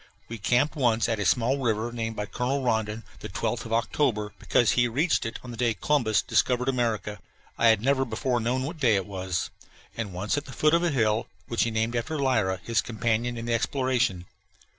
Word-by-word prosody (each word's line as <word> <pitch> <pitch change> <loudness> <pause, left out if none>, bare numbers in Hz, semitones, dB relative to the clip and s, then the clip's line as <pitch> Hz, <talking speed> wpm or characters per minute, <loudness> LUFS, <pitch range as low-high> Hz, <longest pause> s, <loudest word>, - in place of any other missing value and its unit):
We 115 0 -6
camped 125 - +2
once 120 -6 +2
at 110 -2 -1
a 105 - -1
small 125 +3 +2
river 115 -2 0
named 115 -1 -3
by 105 - -3
Colonel 125 +6 -2
Rondon 110 -2 -1 0.2
the - - -7
"Twelfth - - -2
of - - -11
October," 115 -3 0
because 120 - +3
he 120 0 +3
reached 135 +1 +1
it 115 - -5
on 125 - -8
the 120 - -8
day 115 -2 +1
Columbus 110 - +1
discovered 125 0 +1
America 115 -5 -1 0.4
I 115 - +3
had 110 -1 +4
never 135 0 +3
before 125 0 -1
known 125 +3 0
what 160 +4 -5
day 120 -7 +4
it 95 -2 0
was! 95 -3 -3 0.4
and 110 -4 -4
once 100 +10 -1
at 145 - -14
the 135 - -10
foot 155 +1 +2
of 170 +1 +3
a 175 - +2
hill 110 -6 +1 0.2
which 115 - +1
he - - 0
had 110 - -7
named 115 +2 0
after 120 +7 -2
Lyra, 110 -9 +1
his 115 -1 +1
companion 120 +1 -1
in 115 - -5
the 120 - 0
exploration. 120 -5 0
115 Hz, 215 wpm, -26 LUFS, 110-130 Hz, 0.4 s, had